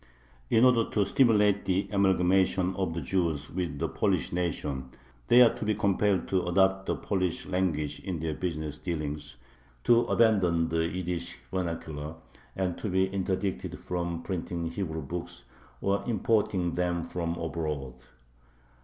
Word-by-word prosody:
In 115 Hz, +3 st, +5 dB
order 120 Hz, -3 st, +4 dB
to 105 Hz, -2 st, +1 dB
stimulate 105 Hz, -2 st, +4 dB
the 95 Hz, +1 st, +1 dB
amalgamation 95 Hz, -1 st, +3 dB
of 90 Hz, -4 st, -2 dB
the 85 Hz, -, -2 dB
Jews 80 Hz, -3 st, -1 dB
with 85 Hz, -5 st, -3 dB
the -, -, -1 dB
Polish -, -, 0 dB
nation, 75 Hz, -7 st, -2 dB, 0.4 s
they 125 Hz, +1 st, +8 dB
are 115 Hz, -, +5 dB
to -, -, -6 dB
be 105 Hz, 0 st, +1 dB
compelled 100 Hz, -1 st, +1 dB
to 95 Hz, -2 st, +1 dB
adopt 95 Hz, +1 st, +2 dB
the -, -, +1 dB
Polish 95 Hz, -4 st, -1 dB
language 80 Hz, -6 st, -1 dB
in 90 Hz, -4 st, -4 dB
their 80 Hz, 0 st, -2 dB
business 75 Hz, -3 st, -4 dB
dealings, 75 Hz, -4 st, -4 dB, 0.5 s
to 120 Hz, 0 st, +5 dB
abandon 90 Hz, -8 st, +3 dB
the 80 Hz, 0 st, +1 dB
Yiddish 90 Hz, -1 st, -4 dB
vernacular, 80 Hz, -4 st, -4 dB, 0.4 s
and 95 Hz, -2 st, -2 dB
to 105 Hz, -, -3 dB
be 95 Hz, +1 st, +2 dB
interdicted 95 Hz, 0 st, -2 dB
from 85 Hz, -1 st, -3 dB
printing 85 Hz, -2 st, -3 dB
Hebrew 80 Hz, -6 st, -3 dB
books 85 Hz, +5 st, -6 dB, 0.4 s
or 100 Hz, +1 st, +1 dB
importing 105 Hz, -5 st, +1 dB
them 90 Hz, -1 st, 0 dB
from 85 Hz, -1 st, -3 dB
abroad. 75 Hz, -5 st, -3 dB
90 Hz, 145 wpm, -29 LUFS, 80-95 Hz, 0.5 s, they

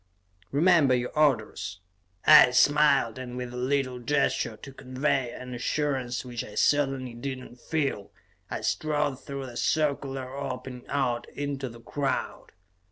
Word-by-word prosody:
"Remember 150 Hz, -3 st, +4 dB
your 125 Hz, 0 st, -2 dB
orders," 120 Hz, -, 0 dB, 0.5 s
I -, -, +9 dB
smiled, 140 Hz, -2 st, +4 dB
and 125 Hz, -1 st, -6 dB
with 125 Hz, -1 st, -5 dB
a -, -, -7 dB
little 130 Hz, 0 st, -1 dB
gesture 120 Hz, -3 st, 0 dB
to 135 Hz, -, -11 dB
convey 130 Hz, -1 st, -1 dB
an 125 Hz, +1 st, -8 dB
assurance 130 Hz, -1 st, -1 dB
which 120 Hz, -2 st, -4 dB
I -, -, -11 dB
certainly 135 Hz, -4 st, +1 dB
did 130 Hz, +3 st, -4 dB
not 125 Hz, -1 st, -12 dB
feel, 140 Hz, -9 st, -2 dB, 0.4 s
I -, -, -4 dB
strode 150 Hz, -3 st, -1 dB
through 140 Hz, -1 st, -5 dB
the 120 Hz, -2 st, -8 dB
circular 135 Hz, -4 st, -1 dB
opening 125 Hz, -2 st, -6 dB
out 125 Hz, -4 st, -1 dB
into 140 Hz, -2 st, -4 dB
the 115 Hz, 0 st, -13 dB
crowd. 140 Hz, +2 st, -3 dB
130 Hz, 140 wpm, -27 LUFS, 125-140 Hz, 0.5 s, I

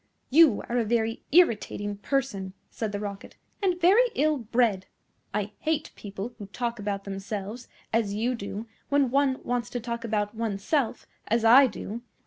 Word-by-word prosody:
"You 295 Hz, -6 st, +6 dB
are 245 Hz, +1 st, 0 dB
a -, -, +2 dB
very 225 Hz, +1 st, 0 dB
irritating 210 Hz, -, +2 dB
person," 205 Hz, -6 st, -2 dB, 0.2 s
said 220 Hz, -2 st, -3 dB
the 205 Hz, -, -3 dB
Rocket, 200 Hz, -1 st, -7 dB, 0.3 s
"and 365 Hz, -3 st, +1 dB
very 410 Hz, +8 st, +5 dB
ill 305 Hz, 0 st, +2 dB
bred. 225 Hz, -4 st, +1 dB, 0.4 s
I 205 Hz, 0 st, -2 dB
hate 315 Hz, -1 st, -1 dB
people 205 Hz, +3 st, -6 dB
who 205 Hz, -, -7 dB
talk 235 Hz, +2 st, -3 dB
about 200 Hz, -1 st, -3 dB
themselves, 200 Hz, +3 st, -5 dB, 0.3 s
as 215 Hz, -3 st, +1 dB
you 235 Hz, +4 st, 0 dB
do, 210 Hz, -1 st, -5 dB, 0.2 s
when 280 Hz, -3 st, +3 dB
one 275 Hz, -1 st, +2 dB
wants 245 Hz, -1 st, -2 dB
to 245 Hz, -, -3 dB
talk 235 Hz, 0 st, -4 dB
about 210 Hz, -2 st, -1 dB
oneself, 225 Hz, +4 st, -1 dB, 0.2 s
as 230 Hz, +1 st, +1 dB
I 260 Hz, +4 st, +8 dB
do. 225 Hz, 0 st, -6 dB
230 Hz, 160 wpm, -27 LUFS, 205-260 Hz, 0.4 s, I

